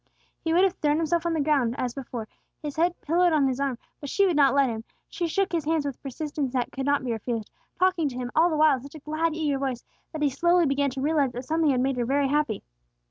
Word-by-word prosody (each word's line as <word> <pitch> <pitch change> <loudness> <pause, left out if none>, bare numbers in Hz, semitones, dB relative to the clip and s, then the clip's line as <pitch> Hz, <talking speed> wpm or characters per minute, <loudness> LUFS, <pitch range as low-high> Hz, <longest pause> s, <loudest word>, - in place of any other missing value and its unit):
He 325 - 0
would 350 +3 +4
have 385 -2 +3
thrown 295 0 +1
himself 330 +1 0
on 335 - 0
the 320 - 0
ground 275 -5 +2
as 250 -3 -2
before, 245 -5 -6 0.3
his 295 -2 -6
head 340 +2 +1
pillowed 345 +2 +2
on 295 -3 +3
his 260 0 -2
arm, 275 -3 -1 0.2
but 285 - -6
she 400 - +3
would 360 -4 +2
not 275 -2 +4
let 280 -1 +4
him. 225 -2 -4 0.2
She 345 - -3
shook 390 +4 0
his 330 -4 -1
hands 315 -1 +1
with 280 - -2
a - - -39
persistence 285 -1 -4
that 250 -2 -1
could 270 0 -4
not 285 -1 +2
be 245 - -1
refused, 225 -1 -3 0.3
talking 365 -5 +2
to 250 - -8
him 245 -1 -4
all 330 +2 +5
the 315 - -1
while 310 -1 +6
in - - -10
such 280 +4 -12
a - - -8
glad 310 +2 -1
eager 295 -4 0
voice 265 -3 -3 0.3
that 310 -2 -3
he 290 - +4
slowly 345 +5 +3
began 280 0 +1
to 265 0 -5
realize 285 -3 +1
that 245 +2 -6
something 320 +1 +1
had 255 -2 +2
made 265 0 0
her 240 - 0
very 275 +2 +1
happy. 290 -7 0
285 Hz, 270 wpm, -26 LUFS, 265-320 Hz, 0.3 s, while